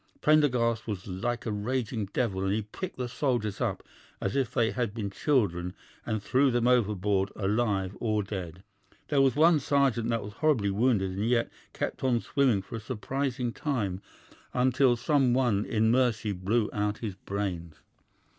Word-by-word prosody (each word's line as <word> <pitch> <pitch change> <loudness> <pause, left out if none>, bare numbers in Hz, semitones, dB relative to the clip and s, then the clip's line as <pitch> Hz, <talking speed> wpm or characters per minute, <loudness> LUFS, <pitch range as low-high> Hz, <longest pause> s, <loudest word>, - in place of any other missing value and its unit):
Prendergast 125 -8 +2
was 100 -4 -4
like 110 +6 -3
a 110 - -1
raging 110 0 -2
devil, 95 -3 -1
and 95 - 0
he 110 +2 0
picked 170 - -7
the 125 -1 -2
soldiers 120 -5 -1
up - - -1 0.4
as 100 - -2
if 135 -4 0
they 115 -1 +1
had 120 -4 -2
been 100 -4 -3
children 95 - 0 0.3
and 110 -2 -2
threw 135 +5 +3
them 120 -1 +1
overboard 105 -5 +2
alive 100 -2 0
or 110 -3 0
dead. 95 -3 -6 0.5
There 145 -2 +3
was 135 -1 +3
one 160 +1 +5
sergeant 135 -5 +1
that 115 -2 0
was 105 0 -8
horribly 115 -7 +1
wounded 105 -3 +2
and 100 +5 -1
yet 120 -1 +1 0.2
kept - - -4
on 125 -3 +2
swimming 125 -7 +1
for 115 - -7
a - - -5
surprising 125 +2 -3
time, 105 -11 -2 0.5
until 130 0 +3
some 130 0 +2
one 120 -6 +2
in 110 0 +2
mercy 120 -4 +2
blew 105 +4 0
out 105 0 -1
his 105 - -3
brains. 90 -4 -4
115 Hz, 165 wpm, -28 LUFS, 100-125 Hz, 0.5 s, one